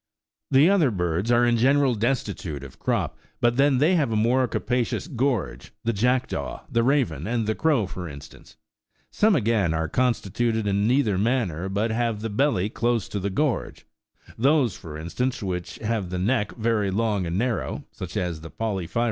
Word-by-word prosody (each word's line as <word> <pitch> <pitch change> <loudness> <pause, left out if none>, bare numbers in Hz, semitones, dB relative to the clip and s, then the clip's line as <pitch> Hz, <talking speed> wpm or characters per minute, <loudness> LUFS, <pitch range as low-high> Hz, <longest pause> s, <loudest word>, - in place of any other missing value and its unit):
The 140 +4 +6
other 185 -8 +4
birds 90 +1 -1
are 120 0 +4
in 120 -1 +3
general 135 +2 +3
destitute 105 - -2
of 65 - -12
crop, - - -1 0.2
but 120 0 +2
then 140 -1 +4
they 155 +8 +3
have 150 -9 +2
a - - 0
more 125 +4 +2
ca - - -2
pacious 125 +3 -1
gorge, 125 -5 -1
the 115 - 0
jackdaw, 115 - -1
the 115 - +2
raven, 115 - +1
and 115 -1 0
the 110 - 0
crow, 145 -5 +2
for 90 -2 -6
in 70 -1 -8
stance: 70 - -15 0.6
some, 215 -1 +3
again, 105 - +1
are 80 0 -1
constituted 115 +1 0
in 100 +1 +1
neither 120 -7 +2
manner, 100 -7 0
but 105 +4 0
have 115 -2 -1
the 115 -1 -3
belly 105 -5 +1
close 115 -1 0
to 100 - -3
the 100 +1 -2
gorge, 140 +5 -2 0.5
those, 135 - +3
for 75 -2 -9
instance, 120 +10 -2
which 90 -2 -4
have 110 -4 -2
the 90 - -3
neck 105 +3 0
very 110 -3 0
long 105 -2 0
and 85 +2 -2
narrow, 115 +1 -2
such - - -7
as 85 -3 -2
the 80 - -9
porphyrio. 100 -5 -3
115 Hz, 180 wpm, -25 LUFS, 95-125 Hz, 0.6 s, The